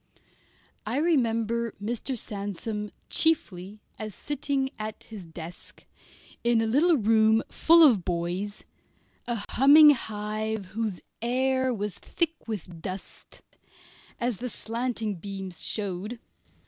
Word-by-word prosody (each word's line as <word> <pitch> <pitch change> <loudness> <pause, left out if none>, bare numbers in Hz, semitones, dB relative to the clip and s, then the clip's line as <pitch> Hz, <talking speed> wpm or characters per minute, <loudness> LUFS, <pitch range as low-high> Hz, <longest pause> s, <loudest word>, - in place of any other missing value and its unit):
I 225 +5 -2
remember 235 -7 +1
Mr. 240 +5 -3
Sandsome 210 +1 -4 0.2
chiefly 210 - +1 0.2
as 215 -2 -6
sitting 280 -2 -2
at 215 0 -5
his 210 -5 -10
desk, 165 +1 -10 0.6
in 235 -1 +3
a 225 - +1
little 300 +9 +4
room 220 0 +4
full 335 +1 +6
of 215 -9 +2
boys, 180 +4 -3 0.6
a 235 -4 -2
humming 295 +3 +8
hive 215 -3 -3
whose 215 -4 -3 0.2
air 260 +2 +1
was 210 -4 -4
thick 330 -5 -2
with 180 -6 -6
dust, 185 +3 -8 0.8
as 240 -3 -1
the 250 +4 -4
slanting 230 -1 -3
sunbeams 195 -1 -7
showed. 205 +2 -2
220 Hz, 110 wpm, -27 LUFS, 205-250 Hz, 0.8 s, humming